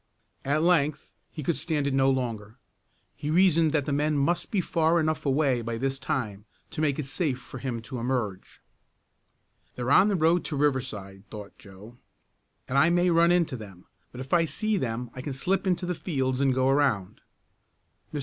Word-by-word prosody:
At 145 +3 +1
length 155 -4 +1 0.2
he 155 - -7
could 165 +4 0
stand 150 -1 -1
it 140 - 0
no 135 0 +3
longer. 115 -4 -3 0.6
He 145 0 -5
reasoned 165 -2 +4
that 145 -3 +1
the 145 - -1
men 150 +1 +1
must 165 +5 0
be 205 - 0
far 165 -1 +2
enough 155 -1 -1
away 135 -3 +2
by 115 0 -4
this 135 +2 -2
time 105 -7 -3 0.3
to - - -4
make 145 -3 +1
it 150 - -3
safe 140 -1 -1
for 130 +1 -10
him 120 -4 -4
to 125 +2 -6
emerge. 115 -6 -3 1.1
"They're 125 +2 -2
on 190 +7 +6
the 205 - +1
road 165 +1 +3
to 150 - -3
Riverside," 110 -9 -2
thought 105 -2 -9
Joe, 105 +4 -14 0.7
"and 135 +2 +2
I 160 +4 +5
may 175 +1 +3
run 170 +1 +4
into 170 -6 +2
them, 100 -6 -11 0.3
but 125 - -10
if 135 +4 -7
I 170 -1 +5
see 215 +9 -1
them 120 - -3
I 130 - -7
can 140 +1 -5
slip 185 +9 -1
into 180 -1 0
the 180 - -1
fields 135 -7 -2
and 135 -1 +3
go 130 0 +1
around. 135 -9 +1 0.9
Mr. 150 - -3
140 Hz, 190 wpm, -27 LUFS, 125-160 Hz, 1.1 s, on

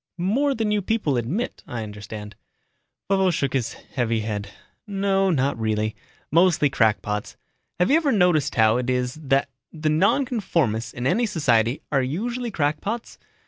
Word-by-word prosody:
"More 260 +11 +1
than 220 -2 0
you 210 -1 +1
people 200 -9 0
admit, 130 - -2
I 120 -2 -4
understand." 105 0 -8 0.7
Vovo 190 -1 +3
shook 140 -6 -1
his 130 -4 -1
heavy 115 -3 -2
head. 105 -2 -4 0.4
"No, 195 -1 +1
not 140 -6 +1
really. 110 -1 -1 0.4
Mostly 165 -3 +4
crackpots. 105 -3 0 0.4
Have 180 +8 +3
you 300 - +6
ever 310 -4 +1
noticed 180 - +2
how 110 -1 +4
it 125 0 -2
is 125 0 0
that 135 -1 +1 0.2
the 155 -1 -2
nonconformists 165 - +1
in 120 - -5
any 225 - +2
society 120 - +1
are 140 -2 +3
usually 235 - -2
crackpots? 200 +7 -2
145 Hz, 145 wpm, -24 LUFS, -, 0.7 s, you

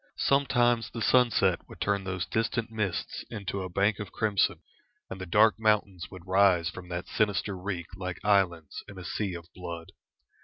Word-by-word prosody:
Sometimes 120 -4 +2
the 115 - -6
sunset 110 -7 +4
would - - -12
turn 100 -1 0
those 90 -2 -2
distant 115 +1 -1
mists 105 -5 -3
into 100 -3 -4
a 95 - -4
bank 100 +4 +1
of 100 -3 -6
crimson, 105 -3 +1 0.5
and 95 - -6
the 95 - -5
dark 105 +3 +4
mountains 105 -5 +1
would 95 -2 -11
rise 95 -3 +4
from 90 -1 -10
that 85 0 -4
sinister 105 -1 0
reek 90 -2 -4
like 90 -2 -5
islands 95 -7 +1
in 105 -2 -11
a 90 - -8
sea 100 -4 -2
of 85 -1 -8
blood. 85 -2 -7
100 Hz, 170 wpm, -28 LUFS, 90-110 Hz, 0.5 s, sunset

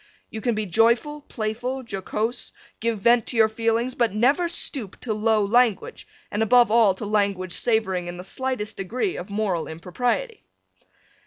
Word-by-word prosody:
You 220 - -6
can 240 -1 0
be 215 0 -2
joyful, 235 - +2
playful, 245 +2 -4
jocose, 220 +4 -3 0.3
give 225 -2 -1
vent 235 +2 +4
to 240 - -4
your 220 -1 +6
feelings, 230 +3 0
but 235 -4 +1
never 280 +10 +2
stoop 265 - -4
to 225 - -2
low 215 0 +2
language 235 0 +1 0.2
and, 205 - -1
above 240 +1 +5
all, 220 -4 +5
to 210 - -6
language 200 -3 0
savoring 190 -7 0
in 175 0 -6
the 180 - -7
slightest 220 0 -3
degree 245 - -2
of 180 +3 -7
moral 200 -5 -1
impropriety. 245 - -3
220 Hz, 160 wpm, -24 LUFS, 200-245 Hz, 0.3 s, your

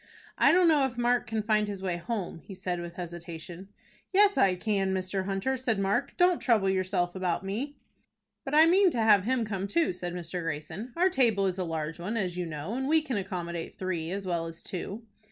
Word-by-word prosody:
"I - - +5
don't 360 0 +5
know 305 -4 +5
if 250 -2 -10
Mark 245 0 +2
can 220 -1 -2
find 215 -1 +2
his 200 -2 -6
way 180 -2 -1
home," 185 -2 -4
he 190 +5 -11
said 180 -1 -3
with 170 0 -7
hesitation. 170 +1 -8 0.4
"Yes, 405 +1 +5
I 190 -2 +4
can, 195 0 0
Mr. 190 +1 -2
Hunter," 195 +7 -1
said 235 -4 0
Mark. 195 0 0
"Don't 355 -1 +4
trouble 215 -6 +3
yourself 185 -1 0
about 185 -1 -1
me." 250 +9 -4 0.7
"But 275 +2 -2
I 315 +1 +8
mean 370 +3 +5
to 285 - -4
have 210 -4 +5
him 250 -1 +1
come 195 -2 -3
too," 325 - +1
said 175 0 -5
Mr. 175 0 -4
Greyson. 165 - -5
"Our 365 +2 +3
table 230 - +3
is 190 0 -1
a - - 0
large 165 -1 -4
one, 210 +7 -3
as 185 -5 -1
you 180 -1 -3
know, 155 +5 -5
and 265 +2 -2
we 315 +1 +3
can 265 -5 -3
accommodate 175 -3 -4
three 170 -4 -3
as 195 +2 -4
well 170 -2 -1
as 165 0 -9
two." 200 +5 -5
195 Hz, 215 wpm, -29 LUFS, 175-240 Hz, 0.7 s, I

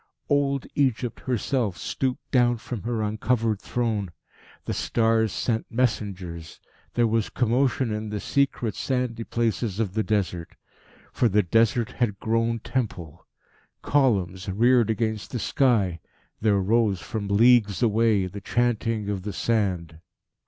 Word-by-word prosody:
Old 140 -2 +1
Egypt 130 -4 0
herself 125 -4 -1
stooped 130 -2 -3
down 120 -2 +3
from 115 -1 -6
her 115 0 -2
uncovered 110 0 0
throne. 110 -5 -1 0.6
The - - -2
stars 110 -2 +1
sent 110 +2 -1
messengers. 95 -9 -2 0.4
There 120 - +3
was 115 -1 0
commotion 125 0 +1
in 105 0 -3
the 105 0 -3
secret, 130 -3 0
sandy 125 -3 -2
places 115 -3 -1
of 105 -5 -1
the 110 - +1
desert. 95 -6 -2 0.6
For 120 - +2
the 105 +1 +3
Desert 115 +5 +2
had 105 -6 -1
grown 115 +1 0
Temple. 90 - -4 0.6
Columns 100 -9 +1
reared 120 +4 +3
against 110 -1 -1
the 125 - -3
sky. 110 -9 +1 0.4
There 105 -2 +2
rose, 105 0 +2
from 105 +3 -5
leagues 110 0 +4
away, 110 -3 +3
the 100 +2 -7
chanting 115 -1 0
of 100 -2 -2
the 105 +2 -5
sand. 90 -8 -1
110 Hz, 130 wpm, -25 LUFS, 100-120 Hz, 0.6 s, leagues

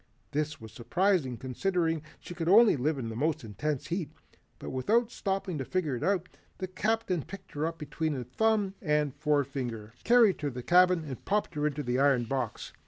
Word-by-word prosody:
This 150 +1 -2
was 110 -1 -10
surprising 170 - +1
considering 165 - -1 0.2
she - - -9
could 170 -1 -2
only 220 +1 +7
live 145 +3 0
in 120 -4 -4
the 110 - -6
most 155 +4 0
intense 130 +7 -3
heat. 170 -4 -2 0.5
But - - -7
without 225 - +1
stopping 190 - -2
to - - -1
figure 155 -2 -1
it 120 - -5
out, 185 -2 +1 0.3
the 185 - -3
Captain 190 -1 -1
picked 195 +5 -11
her 150 +2 -1
up 165 0 -5
between 150 -2 -3
thumb 205 - +1
and 150 -4 +1
forefinger, 135 -7 -2
carried 230 -7 +5
her 145 - 0
to - - -9
the 125 - -5
cabin 180 0 +5
and 135 -4 -7
popped 210 +1 0
her 150 0 0
into 150 0 -3
the 125 0 0
iron 135 -3 +4
box. 125 -1 -3
155 Hz, 190 wpm, -29 LUFS, 135-185 Hz, 0.5 s, only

